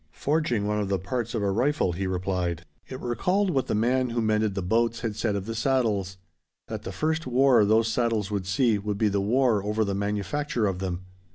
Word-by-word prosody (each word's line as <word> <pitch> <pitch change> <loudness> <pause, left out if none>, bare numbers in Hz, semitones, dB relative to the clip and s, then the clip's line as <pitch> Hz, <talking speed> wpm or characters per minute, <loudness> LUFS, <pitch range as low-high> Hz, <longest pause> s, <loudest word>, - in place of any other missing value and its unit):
"Forging 140 - 0
one 105 0 0
of 100 -2 -2
the 100 - +1
parts 120 +5 -3
of 110 - -1
a 100 - +1
rifle," 125 - +1
he 95 +3 -3
replied. 90 -2 -2 0.2
It 130 - -7
recalled 180 - 0
what 135 -4 0
the - - 0
man 125 +4 +1
who 120 0 -2
mended 110 -2 +1
the 95 - -2
boats 115 +5 +1
had 115 -3 -3
said 105 -1 -1
of 100 -1 -3
the 115 - -4
saddles: 110 -6 0 0.5
that 110 -2 -5
the - - -6
first 155 - -1
war 125 -2 +4
those 110 +2 +3
saddles 110 -3 0
would 100 -3 -2
see 110 +2 +2
would 100 0 -3
be 105 0 +2
the 100 0 0
war 115 0 +2
over 105 +1 0
the 100 - -2
manufacture 105 +6 -1
of 95 -3 -1
them. 90 -1 -4
110 Hz, 215 wpm, -26 LUFS, 100-120 Hz, 0.5 s, war